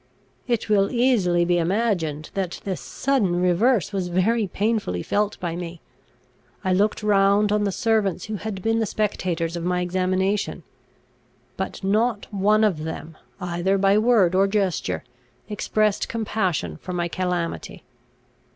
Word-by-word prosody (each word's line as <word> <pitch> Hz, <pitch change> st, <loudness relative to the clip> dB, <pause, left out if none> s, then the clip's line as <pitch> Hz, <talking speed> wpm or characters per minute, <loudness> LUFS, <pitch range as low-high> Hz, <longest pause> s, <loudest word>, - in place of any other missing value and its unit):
It 235 Hz, -3 st, 0 dB
will 200 Hz, -2 st, +3 dB
easily 215 Hz, -9 st, +2 dB
be 175 Hz, 0 st, +2 dB
imagined 170 Hz, -5 st, -1 dB
that 190 Hz, -3 st, -3 dB
this 190 Hz, -3 st, -3 dB
sudden 215 Hz, -11 st, 0 dB
reverse 200 Hz, +5 st, +2 dB
was 190 Hz, -2 st, -1 dB
very 200 Hz, +5 st, +1 dB
painfully 205 Hz, -, -1 dB
felt 205 Hz, 0 st, -1 dB
by 170 Hz, -2 st, -3 dB
me. 170 Hz, -1 st, -6 dB, 0.8 s
I 185 Hz, -1 st, +1 dB
looked 205 Hz, +3 st, +1 dB
round 200 Hz, 0 st, +3 dB
on 210 Hz, 0 st, +2 dB
the 200 Hz, -, 0 dB
servants 210 Hz, -4 st, 0 dB
who 215 Hz, -1 st, -4 dB
had 200 Hz, -3 st, -5 dB
been 225 Hz, 0 st, +2 dB
the 220 Hz, -, 0 dB
spectators 175 Hz, -5 st, -1 dB
of 170 Hz, -, -4 dB
my 180 Hz, 0 st, 0 dB
examination, 185 Hz, +3 st, 0 dB, 0.9 s
but -, -, -5 dB
not 210 Hz, +2 st, +1 dB
one 210 Hz, +2 st, +3 dB
of 180 Hz, -8 st, +1 dB
them, 160 Hz, 0 st, -6 dB, 0.2 s
either 180 Hz, +2 st, 0 dB
by 195 Hz, +1 st, +3 dB
word 215 Hz, -6 st, +4 dB
or 195 Hz, +1 st, +4 dB
gesture, 195 Hz, -8 st, -1 dB, 0.4 s
expressed 210 Hz, 0 st, 0 dB
compassion 190 Hz, -, -1 dB
for 180 Hz, -, -7 dB
my 175 Hz, -1 st, -1 dB
calamity. 180 Hz, -1 st, -3 dB
195 Hz, 140 wpm, -23 LUFS, 175-215 Hz, 0.9 s, word